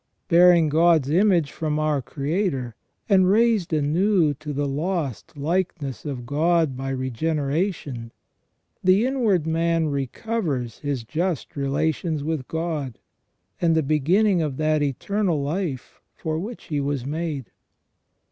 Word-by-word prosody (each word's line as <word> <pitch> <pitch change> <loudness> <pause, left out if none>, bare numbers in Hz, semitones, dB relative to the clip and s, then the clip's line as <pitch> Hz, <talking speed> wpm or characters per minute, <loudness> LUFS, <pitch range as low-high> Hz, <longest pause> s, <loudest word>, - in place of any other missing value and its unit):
Bearing 175 -1 +6
God's 160 -2 +3
image 175 -4 +3
from 155 -2 -2
our 155 -2 +1
Creator, 140 - -2 0.3
and 190 -4 +4
raised 220 -4 +3
anew 160 +2 +2
to 150 +2 -7
the 145 0 -1
lost 150 - -3
likeness 155 - -2
of 130 -4 -5
God 155 +1 +1
by 135 +1 -4
regeneration, 140 - -2 0.7
the 190 +5 +4
inward 225 - +1
man 165 0 +1
recovers 140 - -3
his 140 -5 -3
just 160 +5 -2
relations 155 +2 -1
with 155 -4 -3
God, 160 - -3 0.6
and 165 -2 +3
the 160 - +2
beginning 170 +7 +2
of 145 -4 -2
that 155 -1 +1
eternal 170 - 0
life 145 -2 -4
for 160 -1 -3
which 215 +7 -6
he 150 -2 -2
was 140 -2 -2
made. 150 -3 -4
155 Hz, 125 wpm, -24 LUFS, 140-175 Hz, 0.7 s, Bearing